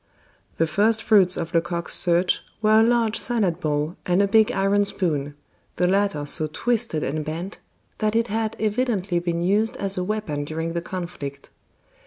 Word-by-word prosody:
The 165 Hz, -, +3 dB
first 210 Hz, +8 st, +2 dB
fruits 190 Hz, -5 st, +4 dB
of 165 Hz, -, -4 dB
Lecoq's 170 Hz, 0 st, -1 dB
search 175 Hz, +1 st, +2 dB, 0.2 s
were 215 Hz, 0 st, +4 dB
a -, -, +6 dB
large 230 Hz, -1 st, +1 dB
salad 215 Hz, -8 st, 0 dB
bowl 150 Hz, +2 st, -2 dB
and 180 Hz, +1 st, +1 dB
a 200 Hz, -, +3 dB
big 220 Hz, +1 st, +4 dB
iron 200 Hz, +1 st, +2 dB
spoon, 150 Hz, -8 st, -1 dB, 0.4 s
the 180 Hz, -, +1 dB
latter 195 Hz, -5 st, +1 dB
so 155 Hz, +2 st, +1 dB
twisted 225 Hz, -4 st, -1 dB
and 155 Hz, +2 st, -2 dB
bent 165 Hz, +6 st, -6 dB, 0.4 s
that 215 Hz, 0 st, 0 dB
it 230 Hz, 0 st, +3 dB
had 225 Hz, 0 st, -2 dB
evidently 210 Hz, -5 st, 0 dB
been 170 Hz, 0 st, -2 dB
used 210 Hz, +5 st, +1 dB
as 195 Hz, -1 st, 0 dB
a -, -, -1 dB
weapon 185 Hz, -8 st, -3 dB
during 160 Hz, +2 st, -4 dB
the 170 Hz, -, -2 dB
conflict. 170 Hz, -6 st, -7 dB
185 Hz, 170 wpm, -23 LUFS, 165-215 Hz, 0.4 s, a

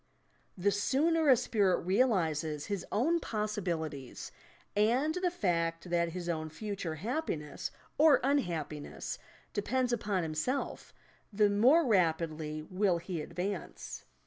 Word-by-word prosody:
The 200 Hz, +3 st, +2 dB
sooner 295 Hz, +9 st, +2 dB
a 260 Hz, -, +8 dB
spirit 200 Hz, -5 st, +2 dB
realizes 165 Hz, -, +1 dB
his 200 Hz, -3 st, -3 dB
own 320 Hz, +11 st, +2 dB
possibilities, 175 Hz, -, -3 dB, 0.4 s
and 245 Hz, +9 st, +3 dB
the 360 Hz, +1 st, +1 dB
fact 170 Hz, -, -1 dB
that 170 Hz, -1 st, +1 dB
his 175 Hz, -1 st, -5 dB
own 160 Hz, -2 st, -2 dB
future 185 Hz, -1 st, -4 dB
happiness 165 Hz, -, -3 dB, 0.3 s
or 310 Hz, -2 st, +7 dB
unhappiness 170 Hz, -, -2 dB, 0.3 s
depends 250 Hz, +4 st, 0 dB
upon 205 Hz, -5 st, 0 dB
himself, 160 Hz, -, -2 dB, 0.4 s
the 205 Hz, 0 st, +3 dB
more 260 Hz, +11 st, +5 dB
rapidly 160 Hz, -6 st, +1 dB
will 185 Hz, +1 st, +1 dB
he 170 Hz, -1 st, -4 dB
advance. 185 Hz, +3 st, -5 dB
195 Hz, 115 wpm, -32 LUFS, 165-240 Hz, 0.4 s, a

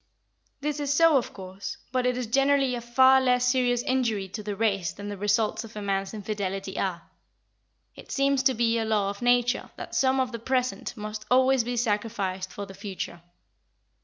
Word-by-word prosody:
This 300 Hz, 0 st, -2 dB
is 285 Hz, -1 st, -1 dB
so, 330 Hz, +1 st, +5 dB
of 250 Hz, -, -2 dB
course, 190 Hz, 0 st, -7 dB
but 255 Hz, 0 st, +1 dB
it 250 Hz, 0 st, 0 dB
is 250 Hz, -, -2 dB
generally 275 Hz, +2 st, +2 dB
a 240 Hz, -, -3 dB
far 260 Hz, +3 st, +5 dB
less 250 Hz, -1 st, +2 dB
serious 245 Hz, -1 st, +2 dB
injury 230 Hz, -7 st, 0 dB
to 210 Hz, +3 st, -6 dB
the 205 Hz, -1 st, -4 dB
race 195 Hz, -5 st, 0 dB
than 205 Hz, 0 st, -8 dB
the 205 Hz, -, -4 dB
results 210 Hz, +3 st, 0 dB
of 225 Hz, -1 st, -12 dB
a 210 Hz, -, -5 dB
man's 195 Hz, -1 st, -1 dB
infidelity 195 Hz, -2 st, -4 dB
are. 175 Hz, -3 st, -2 dB, 0.9 s
It -, -, -12 dB
seems 275 Hz, -1 st, +2 dB
to 265 Hz, -1 st, +2 dB
be 230 Hz, 0 st, +2 dB
a -, -, 0 dB
law 210 Hz, -3 st, +1 dB
of 200 Hz, -, -11 dB
nature 245 Hz, 0 st, +2 dB
that -, -, -8 dB
some 265 Hz, 0 st, +2 dB
of 255 Hz, -1 st, 0 dB
the 230 Hz, -, -5 dB
present 255 Hz, +1 st, -2 dB
must 215 Hz, 0 st, -6 dB
always 260 Hz, 0 st, +4 dB
be 245 Hz, +1 st, -3 dB
sacrificed 205 Hz, -5 st, -1 dB
for 200 Hz, -, -6 dB
the 195 Hz, -, -11 dB
future. 190 Hz, -3 st, -6 dB
230 Hz, 190 wpm, -26 LUFS, 200-255 Hz, 0.9 s, so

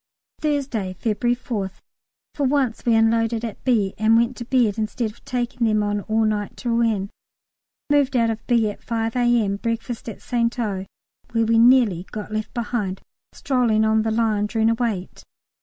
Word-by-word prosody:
Thursday, 270 Hz, -11 st, -1 dB
February 240 Hz, +3 st, 0 dB
4th. 205 Hz, -6 st, -5 dB, 0.5 s
For 285 Hz, -, -1 dB
once 260 Hz, -4 st, 0 dB
we 230 Hz, -, +5 dB
unloaded 225 Hz, +1 st, +2 dB
at 225 Hz, -, -7 dB
B. 215 Hz, -7 st, +2 dB
and 220 Hz, +1 st, +4 dB
went 235 Hz, +2 st, +1 dB
to 240 Hz, -, -6 dB
bed 230 Hz, -4 st, +2 dB
instead 220 Hz, +1 st, -2 dB
of 220 Hz, -, -22 dB
taking 240 Hz, -1 st, -1 dB
them 215 Hz, -1 st, +2 dB
on 205 Hz, 0 st, -1 dB
all 220 Hz, +2 st, +1 dB
night 210 Hz, -1 st, -2 dB
to 240 Hz, -, -2 dB
Rouen. 225 Hz, -4 st, +1 dB, 0.8 s
Moved 285 Hz, -2 st, +2 dB
out 230 Hz, -1 st, +3 dB
of 225 Hz, 0 st, -7 dB
B. 235 Hz, -3 st, +3 dB
at -, -, -13 dB
5 225 Hz, -1 st, -2 dB
A.M., 240 Hz, -5 st, +2 dB
breakfast 230 Hz, +1 st, -4 dB
at 215 Hz, -, -8 dB
St 235 Hz, -1 st, -1 dB
O., 195 Hz, -5 st, -2 dB, 0.5 s
where 230 Hz, -1 st, +2 dB
we 225 Hz, 0 st, +3 dB
nearly 230 Hz, -7 st, +4 dB
got 215 Hz, 0 st, -6 dB
left 215 Hz, 0 st, -3 dB
behind 225 Hz, -5 st, -2 dB, 0.3 s
strolling 235 Hz, -5 st, +1 dB
on 220 Hz, 0 st, +3 dB
the 220 Hz, -, -1 dB
line 220 Hz, -2 st, +1 dB
during 225 Hz, +1 st, +2 dB
a -, -, +3 dB
wait. 225 Hz, -6 st, -3 dB
225 Hz, 175 wpm, -22 LUFS, 215-240 Hz, 0.8 s, we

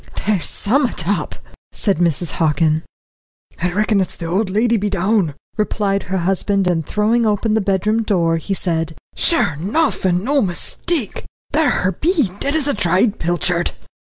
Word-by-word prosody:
"There's 205 Hz, -4 st, 0 dB
some'ut 235 Hz, -, 0 dB
up," 205 Hz, -, -1 dB, 0.4 s
said 200 Hz, -5 st, +1 dB
Mrs. 170 Hz, -1 st, 0 dB
Hockin. 155 Hz, -1 st, +1 dB, 0.8 s
"I 180 Hz, +1 st, +1 dB
reckon 210 Hz, +1 st, +1 dB
it's 185 Hz, -, -1 dB
the 170 Hz, -, -7 dB
old 190 Hz, +5 st, 0 dB
lady 225 Hz, +4 st, +2 dB
be 210 Hz, -1 st, 0 dB
down," 195 Hz, -5 st, +1 dB, 0.2 s
replied 205 Hz, -2 st, 0 dB
her 190 Hz, +1 st, -3 dB
husband, 195 Hz, +2 st, +1 dB
and, 175 Hz, -3 st, +1 dB
throwing 215 Hz, +8 st, +1 dB
open 210 Hz, +1 st, +1 dB
the 220 Hz, -, +2 dB
bedroom 200 Hz, +3 st, +1 dB
door, 170 Hz, -6 st, +1 dB
he 195 Hz, +4 st, -3 dB
said: 165 Hz, -3 st, -2 dB, 0.2 s
"Sure 330 Hz, -, +3 dB
enough, 205 Hz, -, 0 dB
and 180 Hz, -1 st, +1 dB
no 280 Hz, +4 st, +2 dB
mistake 220 Hz, -, -2 dB, 0.3 s
there 305 Hz, +1 st, +3 dB
her 185 Hz, -, +1 dB
be, 300 Hz, -, 0 dB
dead 280 Hz, +2 st, -1 dB
as 300 Hz, -3 st, +1 dB
a 285 Hz, -, +2 dB
dried 195 Hz, +2 st, +1 dB
pilchard." 165 Hz, -6 st, 0 dB
195 Hz, 160 wpm, -19 LUFS, 175-220 Hz, 0.8 s, Sure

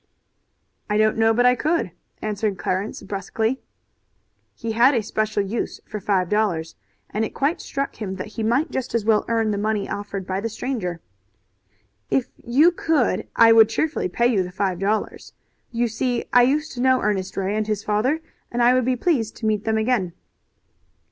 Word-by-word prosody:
"I 210 Hz, -, +1 dB
don't 215 Hz, 0 st, +3 dB
know 225 Hz, 0 st, +3 dB
but 245 Hz, +2 st, +2 dB
I 250 Hz, -, +6 dB
could," 295 Hz, -, 0 dB, 0.3 s
answered 210 Hz, -2 st, -1 dB
Clarence 190 Hz, +4 st, -3 dB
brusquely. 220 Hz, +5 st, -2 dB, 0.9 s
He 230 Hz, -1 st, -4 dB
had 245 Hz, +5 st, +5 dB
a 230 Hz, -, +1 dB
special 215 Hz, -1 st, -1 dB
use 215 Hz, +4 st, -3 dB
for 210 Hz, -, -6 dB
five 195 Hz, -3 st, +1 dB
dollars, 180 Hz, -6 st, 0 dB, 0.4 s
and 215 Hz, -, -1 dB
it 220 Hz, -, -4 dB, 0.3 s
struck 275 Hz, -1 st, -4 dB
him 195 Hz, -3 st, -4 dB
that 185 Hz, +2 st, -6 dB
he 220 Hz, -, -6 dB
might 255 Hz, +8 st, +1 dB
just 255 Hz, -2 st, -3 dB
as 225 Hz, -3 st, 0 dB
well 220 Hz, -1 st, +3 dB
earn 225 Hz, -2 st, +1 dB
the 205 Hz, -, -1 dB
money 215 Hz, -1 st, -1 dB
offered 200 Hz, -2 st, -5 dB
by 190 Hz, 0 st, -2 dB
the 230 Hz, -, -2 dB
stranger. 210 Hz, -8 st, -4 dB, 1.1 s
"If 265 Hz, -, +1 dB
you 290 Hz, +9 st, +4 dB
could 320 Hz, -7 st, 0 dB
I 230 Hz, 0 st, +7 dB
would 225 Hz, -1 st, +7 dB
cheerfully 305 Hz, -, -1 dB
pay 235 Hz, +6 st, 0 dB
you 235 Hz, -6 st, +3 dB
the 180 Hz, 0 st, -4 dB
five 190 Hz, -2 st, -1 dB
dollars. 205 Hz, +2 st, -2 dB, 0.4 s
You 240 Hz, 0 st, 0 dB
see 240 Hz, +2 st, -1 dB
I 245 Hz, -, +7 dB
used 295 Hz, +5 st, +1 dB
to 245 Hz, -, -5 dB
know 260 Hz, 0 st, +3 dB
Ernest 195 Hz, -2 st, -1 dB
Ray 195 Hz, +1 st, -1 dB
and 215 Hz, 0 st, -1 dB
his 210 Hz, -1 st, -2 dB
father, 245 Hz, +10 st, +1 dB, 0.3 s
and 240 Hz, 0 st, +1 dB
I 245 Hz, +1 st, +6 dB
would 255 Hz, -1 st, +2 dB
be 255 Hz, 0 st, +2 dB
pleased 240 Hz, -5 st, 0 dB
to 225 Hz, -, -6 dB
meet 215 Hz, -1 st, 0 dB
them 220 Hz, 0 st, +1 dB
again." 220 Hz, -6 st, 0 dB
220 Hz, 185 wpm, -23 LUFS, 205-245 Hz, 1.1 s, I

